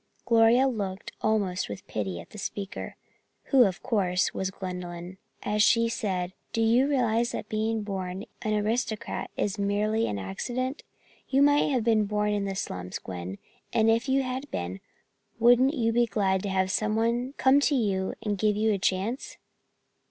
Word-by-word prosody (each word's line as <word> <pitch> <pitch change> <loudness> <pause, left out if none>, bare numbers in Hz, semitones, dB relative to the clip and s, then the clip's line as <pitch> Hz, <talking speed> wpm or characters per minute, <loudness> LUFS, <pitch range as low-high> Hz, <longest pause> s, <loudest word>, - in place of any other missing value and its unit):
Gloria 230 +3 +5
looked 200 -6 -4
almost 200 - 0
with 100 - -7
pity 95 -5 -3
at 85 - -12
the 210 - -9
speaker, 200 0 -5 0.6
who, 260 -3 +7
of 190 -2 -2
course, 185 -4 +1
was 190 - -2
Gwendolyn, 180 -1 -7 0.2
as 210 0 +1
she 230 +1 +4
said: 185 -6 -2 0.2
"Do - - -1
you 240 +4 +4
realize 240 -4 +1
that 210 - -5
being 220 0 -1
born 190 -1 -4 0.2
an 215 -1 0
aristocrat 220 +1 -2
is 205 0 -1
merely 210 +3 +1
an 100 - -2
accident? 245 - -3 0.5
You 275 +1 +4
might 290 +1 +4
have 255 -5 +1
been 220 -2 +3
born 210 0 0
in 205 -1 -1
the 195 -1 -3
slums, 90 - -4
Gwen, 90 +1 -6 0.4
and 225 0 +4
if 230 +4 +1
you 270 +1 +3
had 260 +2 -4
been, 90 +2 -4 0.6
wouldn't 245 +5 +5
you 230 -4 +1
be 240 0 +3
glad 195 -3 +1
to 200 - -3
have 190 0 +1
someone 230 +5 0
come 270 +2 +5
to 285 0 +2
you 195 -6 0
and 205 -2 -1
give 210 0 +2
you 215 +1 +2
a 200 - -1
chance?" 195 +8 -1
215 Hz, 170 wpm, -27 LUFS, 190-235 Hz, 0.6 s, who